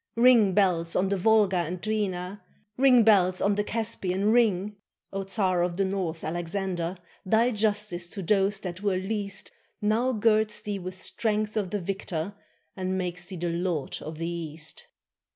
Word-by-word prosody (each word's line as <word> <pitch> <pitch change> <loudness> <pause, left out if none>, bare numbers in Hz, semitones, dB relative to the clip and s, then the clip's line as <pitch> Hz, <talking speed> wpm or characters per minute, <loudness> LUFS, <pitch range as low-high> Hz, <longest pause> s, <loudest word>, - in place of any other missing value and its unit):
Ring, 230 -5 +5
bells, 175 -4 +2
on 190 +1 +2
the 200 - +1
Volga 205 -1 +3
and 175 +1 -2
Dwina, 200 -2 -2 0.3
Ring, 255 -2 +6
bells, 185 -4 +4
on 200 - +2
the 205 +1 0
Caspian, 210 -3 -1
ring! 210 -4 +2 0.4
O 195 0 -2
Czar 190 -3 +1
of 175 0 -1
the 195 - +2
North, 185 -4 -3
Alexander, 175 +1 -3 0.3
Thy 225 +5 +3
justice 210 -5 -1
to 195 +2 -6
those 195 +1 +2
that 180 0 -6
were 200 -3 +1
least 200 0 -3 0.3
Now 220 +4 +1
girds 215 -2 +2
thee 205 -1 -3
with 185 0 -7
strength 215 +1 -1
of 205 -4 -1
the 205 - -2
victor. 185 -1 -3 0.4
And 185 0 -2
makes 180 -1 -3
thee 185 +2 -7
the 175 +1 -2
lord 170 -3 -2
of 155 0 -7
the 165 +1 -3
East! 160 -2 -5
195 Hz, 165 wpm, -27 LUFS, 180-210 Hz, 0.4 s, Ring